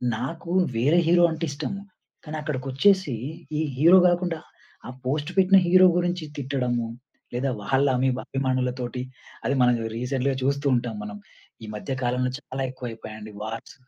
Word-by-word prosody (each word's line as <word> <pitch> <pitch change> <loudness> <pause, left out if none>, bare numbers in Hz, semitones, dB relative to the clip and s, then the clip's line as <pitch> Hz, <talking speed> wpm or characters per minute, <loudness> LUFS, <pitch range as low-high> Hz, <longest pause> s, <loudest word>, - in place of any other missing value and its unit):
నాకు 165 +8 -5 0.2
వేరే 145 +9 +4
హీరో 175 0 +5
అంటే 160 +1 -2
ఇష్టం. 145 +3 -4 0.5
కానీ 155 +1 -5
అక్కడికొచ్చేసి 150 +4 +1 0.5
ఈ - - +2 0.2
హీరో 170 +6 +7
గాకుండా 175 -2 0 0.5
ఆ - - -6 0.2
పోస్ట్ 145 +4 -1
పెట్టిన 190 +1 +6
హీరో 185 +1 +7
గురించి 175 -1 0
తిట్టడము. 125 -4 -1 0.5
లేదా 130 +3 0
వాళ్ళ 135 +6 +2
అమీబా 130 0 +1
అభిమానులతోటి 130 -2 -1 0.4
అది 135 - +2
మనం 125 -1 +5 0.2
రీసెంటలీ‌గా 130 +2 -1
చూస్తూ 140 +1 0
ఉంటాం 120 -2 -2
మనం. 105 0 -7 0.5
ఈ - - -6
మధ్య 105 - -6
కాలంలో 125 +1 0
చాలా 135 -1 -6
ఎక్కువైపోయాయండి 110 -4 -8
వార్స్. 110 +1 -6
135 Hz, 140 wpm, -25 LUFS, 125-160 Hz, 0.5 s, హీరో